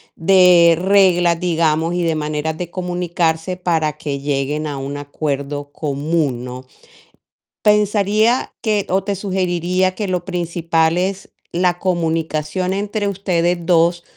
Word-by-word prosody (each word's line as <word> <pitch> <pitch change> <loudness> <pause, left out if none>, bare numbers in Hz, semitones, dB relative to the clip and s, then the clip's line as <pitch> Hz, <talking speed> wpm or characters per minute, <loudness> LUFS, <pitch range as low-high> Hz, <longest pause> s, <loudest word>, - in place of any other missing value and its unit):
de 175 -2 +5
reglas, 180 -3 +3
digamos, 165 -1 +1
y 175 - 0
de 165 -1 0
maneras 155 +1 -3
de 175 0 -5
comunicarse 175 -1 -2
para 165 -4 0
que 145 -2 -4
lleguen 145 +2 -2
a 145 -2 -4
un 135 +1 -5
acuerdo 145 0 -4
común, 145 -3 -2
¿no? 125 +1 -8 1.0
Pensaría 210 +3 +2
que 210 -3 0
o 190 +1 +1
te 200 0 -2
sugeriría 185 -1 0
que 210 0 -3
lo 180 -2 -2
principal 170 -2 0
es 190 +2 -2 0.2
la 175 0 +1
comunicación 165 0 -1
entre 205 +1 -2
ustedes 180 -3 0
2 170 0 +2
170 Hz, 125 wpm, -18 LUFS, 155-185 Hz, 1.0 s, de